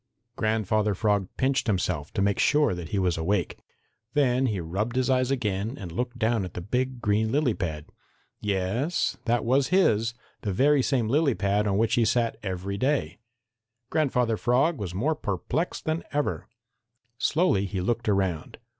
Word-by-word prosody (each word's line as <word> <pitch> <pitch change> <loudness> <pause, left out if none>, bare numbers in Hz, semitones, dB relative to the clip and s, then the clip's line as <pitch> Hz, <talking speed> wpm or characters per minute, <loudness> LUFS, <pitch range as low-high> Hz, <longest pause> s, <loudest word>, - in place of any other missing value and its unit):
Grandfather 110 -1 +1
Frog 100 -2 +1
pinched 130 -1 +1
himself 90 -7 -1
to 95 - +1
make 100 0 +1
sure 145 -7 +3
that 85 -2 -6
he 100 - -2
was 90 -4 +1
awake. 90 +1 -1 0.6
Then 130 -2 +3
he 105 -5 -1
rubbed 95 +8 -3
his 130 +1 +1
eyes 130 -1 +2
again 110 -2 -1
and 90 -5 -7
looked 120 +7 -3
down 110 -2 +1
at 90 - -7
the - - -3
big 125 +6 -2
green 110 +1 +1
lily 140 -4 +2
pad. 80 -7 -4 0.5
Yes, 105 - -1
that 120 0 +1
was 130 +3 +3
his, 115 - +2 0.3
the 100 - -2
very 140 +7 +4
same 125 -4 +1
lily 140 +1 +2
pad 100 +2 +1
on 100 -1 +1
which 115 +1 +2
he 120 - +4
sat 115 +1 +1
every 100 0 -4
day. 130 - 0 0.7
Grandfather 125 -7 +1
Frog 135 +8 +2
was 90 -4 -5
more 140 +12 +1
perplexed 140 - -3
than 160 +1 -1
ever. 145 0 -1 0.7
Slowly 135 - +2
he 95 0 -3
looked 115 +4 -1
around. 95 -5 -1
110 Hz, 165 wpm, -26 LUFS, 95-130 Hz, 0.7 s, very